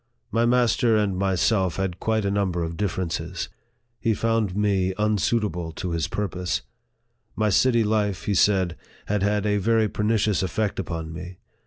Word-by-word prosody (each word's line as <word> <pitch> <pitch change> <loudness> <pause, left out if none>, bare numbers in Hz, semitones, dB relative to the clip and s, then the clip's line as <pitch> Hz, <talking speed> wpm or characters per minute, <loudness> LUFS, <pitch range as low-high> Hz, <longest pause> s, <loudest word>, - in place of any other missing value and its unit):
My 115 +2 +2
master 120 -2 +3
and 105 -3 +1
myself 95 0 +1
had 95 -2 -2
quite 110 -2 0
a 100 - +1
number 95 -4 0
of 85 0 -4
differ 95 -1 -1
ences. 85 +1 -4 0.5
He 115 -1 +1
found 115 -3 0
me 95 -3 +1
unsuitable 105 -5 0
to 90 - -4
his 80 -3 -1
purpose. 90 -3 -2 0.7
My 110 -1 +1
city 120 +2 +4
life, 105 -3 0
he 105 - +1
said, 95 -3 +2 0.3
had 105 -1 0
had 105 +1 +1
a 105 0 +2
very 110 +2 +2
pernicious 105 -3 +1
effect 95 +3 -1
upon 80 -3 -4
me. 90 +2 -8
100 Hz, 160 wpm, -24 LUFS, 90-110 Hz, 0.7 s, city